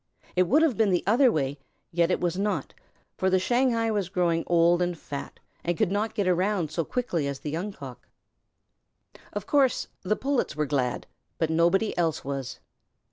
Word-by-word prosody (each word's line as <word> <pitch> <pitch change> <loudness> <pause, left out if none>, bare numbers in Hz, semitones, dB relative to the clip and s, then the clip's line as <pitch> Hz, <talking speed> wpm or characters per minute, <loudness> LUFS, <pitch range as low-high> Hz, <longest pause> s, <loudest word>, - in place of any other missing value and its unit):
It 185 -1 +3
should 305 +5 +5
have 300 -8 +2
been 220 -2 +3
the 180 -2 +1
other 240 +5 +5
way, 140 -1 -1 0.3
yet 170 0 +2
it 180 - +1
was 175 -1 -1
not, 205 +2 -2 0.4
for 190 - +1
the 185 - +4
Shanghai 230 +3 +1
was 200 -4 -1
growing 175 -3 +1
old 170 0 +4
and 175 -1 -1
fat, 140 -2 -7 0.2
and 175 -1 -1
could 210 -4 +1
not 210 +2 -1
get 200 -4 0
around 180 -2 +1
so 165 +1 -1
quickly 175 - -2
as 140 -1 -5
the 150 - -4
Young 180 +7 -3
Cock. 135 - -11 1.2
Of 205 -1 -5
course 275 -3 +2
the 210 +3 0
Pullets 270 - -1
were 150 0 0
glad, 130 -3 -1 0.3
but 160 -1 0
nobody 175 +6 +2
else 165 -5 0
was. 135 -1 -4
180 Hz, 185 wpm, -27 LUFS, 160-210 Hz, 1.2 s, should